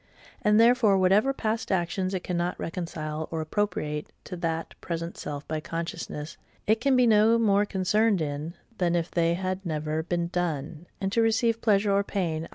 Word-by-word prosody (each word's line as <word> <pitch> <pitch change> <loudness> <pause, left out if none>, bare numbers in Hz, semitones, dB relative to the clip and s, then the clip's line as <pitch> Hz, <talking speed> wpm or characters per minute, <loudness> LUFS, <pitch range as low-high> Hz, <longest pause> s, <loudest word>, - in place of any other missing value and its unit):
And 210 +1 +4
therefore 230 -4 +5
whatever 195 +7 +4
past 225 -5 -2
actions 185 +1 0
it 185 - -3
cannot 175 0 -2
reconcile 160 -3 -4
or 165 - -3
APPROPRIATE 155 -4 -2 0.2
to - - -7
that 165 -1 -3
present 170 0 -4
self 145 -1 -6
by 155 0 -2
consciousness, 165 -1 -5 0.3
it 220 +2 +2
can 275 0 +3
be 250 -1 +5
no 220 0 +5
more 205 -2 +3
concerned 205 +2 +2
in 150 +2 -4 0.2
than 175 -1 +2
if 170 0 -1
they 170 0 +2
had 185 +1 -3
never 155 -2 -2
been 170 +1 -2
done: 165 -2 -3
and 195 -1 -2
to 230 - +2
receive 225 0 +2
pleasure 205 -2 +3
or 200 0 +3
pain, 165 -6 -2
i. - - -13
180 Hz, 175 wpm, -27 LUFS, 165-210 Hz, 0.3 s, therefore